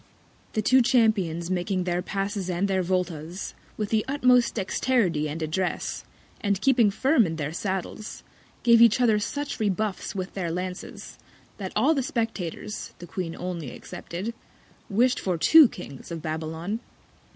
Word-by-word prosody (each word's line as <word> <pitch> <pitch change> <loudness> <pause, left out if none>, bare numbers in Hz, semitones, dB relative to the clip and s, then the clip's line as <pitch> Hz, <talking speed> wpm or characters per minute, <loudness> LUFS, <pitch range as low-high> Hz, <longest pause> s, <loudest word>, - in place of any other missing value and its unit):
The 215 - 0
two 255 +4 +5
Champions 210 -9 +2
making 185 +1 0
their 175 0 0
Passes 195 0 -3
and 180 +2 0
their 190 -1 +1
Volta's, 180 -1 -2 0.2
with 210 -2 -2
the 220 -1 +2
utmost 250 -3 +3
Dexterity 185 -6 +1
and 155 +3 -4
Address, 175 +4 -2 0.4
and 200 -2 +1
keeping 240 -3 +4
firm 240 - +3
in 165 - -3
their 150 -1 -3
Saddles, 195 +3 -4 0.4
gave 235 -1 +6
each 235 0 +6
other 225 -4 +4
such 285 +7 -3
Rebuffs 205 -2 -1
with 185 -1 -4
their 180 -4 -2
Lances, 180 +2 -6 0.4
that - - -5
all 320 - +4
the 280 - 0
Spectators 220 -5 -4
(the 175 - -9
Queen 170 -1 -4
only 175 -6 -4
excepted) 185 - -6 0.6
wish'd 240 +5 +3
for 180 -3 -1
two 310 - +8
Kings 140 -10 -10
of 165 -2 -6
Babylon. 160 +6 -3
195 Hz, 150 wpm, -26 LUFS, 175-225 Hz, 0.6 s, two